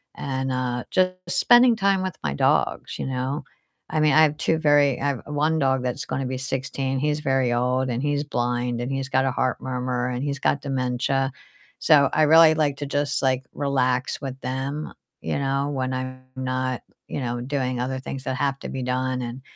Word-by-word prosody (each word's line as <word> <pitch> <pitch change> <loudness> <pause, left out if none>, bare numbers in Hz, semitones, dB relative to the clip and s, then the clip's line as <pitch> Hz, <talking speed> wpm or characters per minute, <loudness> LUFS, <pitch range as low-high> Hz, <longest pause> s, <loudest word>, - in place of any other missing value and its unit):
And, 135 -1 -3
uh, 125 -1 -2
just 185 0 +3 0.2
spending 240 +6 +5
time 195 -2 +2
with 185 -3 -3
my 75 -2 -1
dogs, - - +1
you - - -4
know? 130 +2 -2 0.5
I 155 - 0
mean, 155 -2 +4
I 155 - +6
have 150 -1 +2
2 160 +1 +1
very 145 -4 +4
I 140 - 0
have 140 -4 -2
1 150 +2 0
dog 135 -2 +1
that's 125 -1 -3
gonna 130 +1 -3
be 130 0 -3
16 135 0 -2
he's 150 +1 0
very 135 -4 +1
old, 125 +2 +1
and 120 0 -1
he's 145 0 0
blind, 120 -3 -1
and 120 +1 -3
he's 135 0 -3
got 135 0 +2
a 135 - +1
heart 130 +1 -1
murmur, 125 -1 -2
and 125 +1 -3
he's 140 -1 -2
got 140 - +1
dementia. 135 0 -1 0.5
So, 140 -3 +5
I 155 - +4
really 160 +1 +7
like 150 -3 0
to 145 - -4
just, 145 0 -1
like, 130 -1 +1
relax 130 -2 0
with 135 -1 -6
them, 135 +4 -4 0.3
you - - -2
know, 140 0 0
when 130 -2 -2
I'm 130 0 -5
not, 130 -1 -2 0.3
you - - -3
know, 120 -1 -3
doing 130 -2 -2
other 130 +1 -2
things 130 0 -6
that 130 -1 -2
have 135 0 0
to - - -7
be 130 -1 -4
done 130 0 -1
and 120 +2 -6
135 Hz, 200 wpm, -24 LUFS, 130-145 Hz, 0.5 s, really